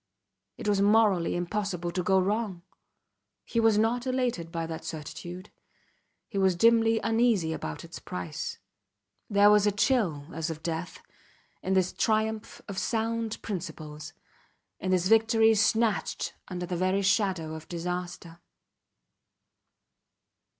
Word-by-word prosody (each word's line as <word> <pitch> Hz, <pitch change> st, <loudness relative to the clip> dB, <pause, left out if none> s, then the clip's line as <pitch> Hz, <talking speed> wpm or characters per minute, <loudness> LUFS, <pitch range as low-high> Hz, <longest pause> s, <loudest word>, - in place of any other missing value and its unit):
It -, -, -6 dB
was 200 Hz, -1 st, +2 dB
morally 205 Hz, -4 st, +3 dB
impossible 175 Hz, -1 st, -2 dB
to 180 Hz, -, -1 dB
go 190 Hz, +2 st, +3 dB
wrong. 200 Hz, -2 st, -1 dB, 0.8 s
He 230 Hz, -, -1 dB
was 225 Hz, -2 st, +4 dB
not 235 Hz, +4 st, +1 dB
elated 245 Hz, -10 st, -1 dB
by 165 Hz, -1 st, -2 dB
that 160 Hz, -1 st, -6 dB
certitude; 175 Hz, +4 st, -7 dB, 0.8 s
he 200 Hz, -, -3 dB
was 190 Hz, -2 st, +3 dB
dimly 225 Hz, +3 st, +4 dB
uneasy 225 Hz, -7 st, +2 dB
about 80 Hz, -, -5 dB
its -, -, -9 dB
price; 90 Hz, -4 st, -5 dB, 0.7 s
there 205 Hz, 0 st, +6 dB
was 210 Hz, 0 st, +5 dB
a -, -, +4 dB
chill 200 Hz, -, +1 dB
as 165 Hz, +1 st, -3 dB
of 160 Hz, -1 st, -6 dB
death 165 Hz, +1 st, -4 dB, 0.6 s
in 190 Hz, -, -1 dB
this 185 Hz, -1 st, +2 dB
triumph 220 Hz, 0 st, -1 dB
of 195 Hz, -2 st, -4 dB
sound 225 Hz, -1 st, -1 dB
principles, 155 Hz, -5 st, -6 dB, 0.7 s
in 185 Hz, -, -3 dB
this 185 Hz, -1 st, +2 dB
victory 225 Hz, +1 st, +5 dB
snatched 220 Hz, +1 st, +1 dB
under 180 Hz, -1 st, -4 dB
the 180 Hz, 0 st, -3 dB
very 185 Hz, +3 st, +1 dB
shadow 185 Hz, -5 st, +1 dB
of 160 Hz, 0 st, -8 dB
disaster. 175 Hz, -1 st, -5 dB
190 Hz, 130 wpm, -28 LUFS, 170-220 Hz, 0.8 s, there